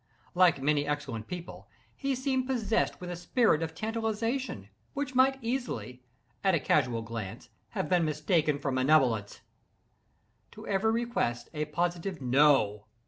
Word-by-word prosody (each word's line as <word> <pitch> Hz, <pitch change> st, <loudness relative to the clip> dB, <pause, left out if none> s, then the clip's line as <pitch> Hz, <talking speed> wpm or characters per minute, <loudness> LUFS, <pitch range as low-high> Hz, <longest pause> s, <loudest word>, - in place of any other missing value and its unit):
Like 180 Hz, -5 st, +4 dB
many 145 Hz, 0 st, +2 dB
excellent 140 Hz, -7 st, -3 dB
people, 175 Hz, -1 st, -8 dB, 0.3 s
he 275 Hz, -1 st, -1 dB
seemed 260 Hz, 0 st, -1 dB
possessed 230 Hz, -4 st, 0 dB
with 180 Hz, -1 st, -6 dB
a -, -, -3 dB
spirit 175 Hz, 0 st, +2 dB
of 160 Hz, 0 st, -4 dB
tantalization, 225 Hz, -, -2 dB, 0.3 s
which 280 Hz, -1 st, -3 dB
might 265 Hz, +1 st, +4 dB
easily, 175 Hz, -, -3 dB, 0.4 s
at 190 Hz, -3 st, +4 dB
a -, -, +2 dB
casual 125 Hz, -5 st, +1 dB
glance, 110 Hz, -4 st, -7 dB, 0.3 s
have -, -, 0 dB
been 180 Hz, -2 st, +3 dB
mistaken 150 Hz, 0 st, +1 dB
for 140 Hz, -1 st, -2 dB
malevolence. 130 Hz, -6 st, +2 dB, 1.1 s
To 215 Hz, -, -11 dB
every 205 Hz, +3 st, +1 dB
request, 230 Hz, -, -1 dB
a 150 Hz, -1 st, -2 dB
positive 175 Hz, +4 st, -2 dB
"No!" 130 Hz, -6 st, +3 dB
165 Hz, 140 wpm, -29 LUFS, 135-225 Hz, 1.1 s, Like